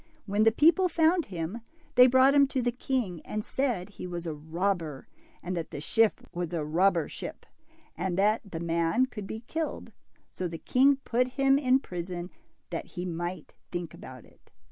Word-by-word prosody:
When 205 +2 +2
the 225 - +7
people 340 +9 +4
found 330 +1 +3
him, 180 +4 -4 0.3
they 250 0 +8
brought 260 +2 +5
him 280 -1 +6
to 265 -1 -1
the 245 - +1
king, 240 -8 -2
and 215 0 -4
said 245 -10 -1
he 200 -3 -8
was 175 -1 -5
a 160 - -2
robber, 160 -1 -2 0.4
and 180 +1 -3
that 165 -2 -3
the - - -6
ship 220 +9 +1
was 175 -1 -3
a 160 -3 -1
robber 170 +1 +2
ship, - - -8 0.5
and 180 +1 -2
that 210 +3 +3
the 165 - -4
man 170 +8 +1
should 210 -3 -6
be 220 +2 -6
killed; 315 +6 -4 0.4
so 185 - -3
the 165 -1 -6
king 270 +9 +4
put 250 +1 +1
him 275 0 +4
in 260 -1 +3
prison, 175 -1 -5 0.4
that - - -4
he 180 - -2
might 175 +1 -5 0.2
think 175 -3 -4
about - - -11
it. - - -24
195 Hz, 185 wpm, -28 LUFS, 175-255 Hz, 0.5 s, they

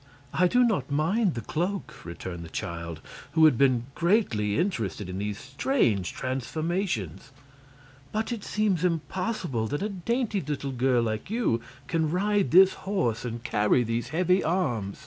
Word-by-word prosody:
"I 180 +2 +4
do 250 +7 +4
not 190 - +1
mind 170 - +1
the 115 - -3
cloak," 180 - -3
returned 85 0 -6
the 85 - -9
child, 85 -1 -5 0.3
who 160 -1 +6
had 155 - +6
been 130 -2 +3
greatly 165 - +1
interested 115 - -1
in 90 +1 -5
these 105 0 -3
strange 130 - 0
transformations. 135 - -3 0.8
"But 220 +2 -2
it 225 -4 -4
seems 205 -5 0
impossible 170 - -1
that 145 - -2
a 210 - -1
dainty 210 +2 -1
little 140 -2 -3
girl 125 -1 +2
like 110 +4 -3
you 215 - +1 0.2
can 160 -2 0
ride 200 +3 +1
this 190 +2 +7 0.2
horse 120 - 0
and 115 -1 -5
carry 105 +4 +2
these 115 +1 -2
heavy 180 +4 +2
arms." 130 - -1
150 Hz, 150 wpm, -27 LUFS, 115-190 Hz, 0.8 s, this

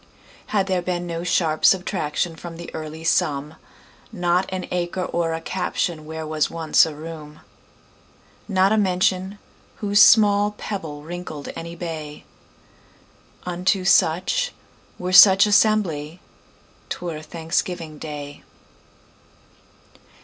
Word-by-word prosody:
Had 200 -3 +1
there 185 -2 0
been 175 0 -3
no 170 -1 -4
sharp 165 -3 0
subtractionFrom 175 -2 0
the 170 - -9
early 155 0 -7
sum, 150 -2 0 0.6
Not 180 -2 0
an 185 -1 -4
acre 180 +1 -2
or 165 -2 -1
a 165 - -6
captionWhere 160 -3 -3
was 155 -1 0
once 165 -1 +3
a 155 - -7
room, 155 -1 -10 1.1
Not 190 -1 +2
a 220 - +3
mention, 190 0 0 0.4
whose 205 0 +2
small 205 -1 +5
pebbleWrinkled 160 -5 -7
any 170 +1 -7
bay,—Unto 175 +3 -6
such, 185 - +2 0.4
were 180 +1 -4
such 190 +1 +9
assembly,'T 185 -7 -2
were 165 -3 -5
Thanksgiving 165 0 -3
day. 145 -2 -7
175 Hz, 100 wpm, -22 LUFS, 160-190 Hz, 1.1 s, such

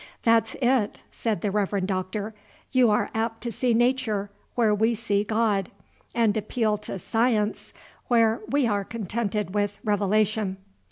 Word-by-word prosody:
"That's 225 -1 +3
it," 245 -4 +1
said 220 -7 -2
the 205 - 0
Reverend 200 -2 0
Doctor; 195 +3 -3 0.4
"you 255 -3 +5
are 210 - +1
apt 225 0 -2
to 235 - -3
see 245 0 +1
'Nature' 230 -5 +1 0.2
where 225 -3 +3
we 220 +3 +2
see 205 -2 0
God, 210 -3 +1 0.5
and 225 -3 +3
appeal 215 0 0
to 210 - -5
'Science' 225 +1 0 0.4
where 230 -1 +3
we 285 -1 +2
are 205 -3 +1
contented 210 -2 -3
with 205 -1 0
Revelation." 210 -1 +1
215 Hz, 145 wpm, -25 LUFS, 205-230 Hz, 0.5 s, you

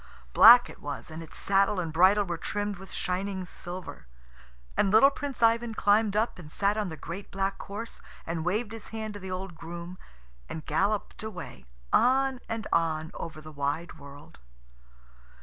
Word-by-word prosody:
Black 240 +2 +9
it - - -13
was, 145 +2 -6
and 160 +1 -7
its 165 - -9
saddle 195 0 +2
and 165 -3 -3
bridle 190 +5 +5
were 175 -2 -3
trimmed 205 +3 -3
with 195 -1 -11
shining 190 +1 -2
silver. 180 - -8 0.7
And 200 - +3
little 225 +8 +7
Prince 275 -4 -4
Ivan 230 0 +3
climbed 205 0 +3
up 220 -2 0
and 150 -4 -11
sat 200 +3 +1
on 210 -3 -1
the 160 - -7
great 190 +6 -7
black 195 0 -2
horse, 215 +4 -7 0.2
and 165 -1 -3
waved 210 +6 -1
his 225 -2 -7
hand 220 -1 -5
to 205 - -8
the 190 -1 -7
old 185 0 -5
groom, 170 +2 -8 0.5
and 160 - -6
galloped 200 +7 -1
away, 200 - -8 0.3
on 265 +1 +3
and 225 -1 -3
on 160 -1 +1
over 160 -2 -7
the 155 0 -10
wide 150 +4 -3
world. 140 +1 -13
195 Hz, 170 wpm, -28 LUFS, 165-215 Hz, 0.7 s, Black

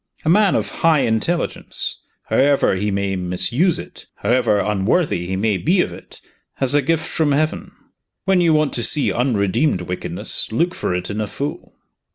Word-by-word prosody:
A - - +2
man 200 +2 +4
of - - 0
high 160 -4 +4
intelligence 115 +10 -2 0.2
however 140 -3 +2
he 100 +3 -1
may 100 -1 -1
misuse 115 - +1
it, - - -10
however 120 -4 +1
unworthy 105 - 0
he 95 - -2
may 100 +1 0
be 175 - +1
of - - -2
it - - -13 0.3
has 135 -1 0
a 145 - +4
gift 160 +3 0
from 150 -3 0
Heaven. 155 +3 -1 0.5
When 190 -2 +3
you 170 -2 +3
want 155 -1 +2
to 120 - -1
see 145 +3 +3
unredeemed 115 - +1
wickedness, 90 +1 -3
look 170 +10 0
for 90 - -2
it 90 +3 -3
in 105 +2 -3
a 105 - -2
fool. 140 +7 -6
130 Hz, 175 wpm, -20 LUFS, 100-160 Hz, 0.5 s, man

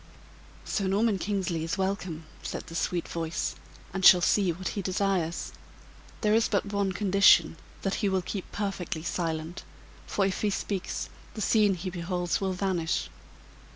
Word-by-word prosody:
"Sir 195 - -1
Norman 200 +1 +2
Kingsley 185 -5 -1
is 165 +4 -2
welcome," 190 -4 -2 0.2
said - - -5
the - - -10
sweet 170 +1 -1
voice, 165 -1 -2 0.4
"and 190 0 -3
shall 180 - +10
see 185 +1 +3
what 185 +3 -4
he 200 - -3
desires. 185 -3 -1 0.7
There 210 -1 +3
is 225 +1 +4
but 200 0 -1
one 200 -1 +1
condition, 190 -3 +5 0.3
that 195 - 0
he 205 - +2
will 190 -1 0
keep 190 +1 -5
perfectly 190 -6 -3
silent; 165 -1 -3 0.4
for 200 - +1
if 190 -1 -1
he 210 - +2
speaks, 195 -1 -3 0.3
the 215 - -4
scene 210 -2 +4
he 185 +1 -5
beholds 175 +1 -1
will 190 -1 0
vanish. 180 -3 -1
190 Hz, 155 wpm, -28 LUFS, 175-200 Hz, 0.7 s, shall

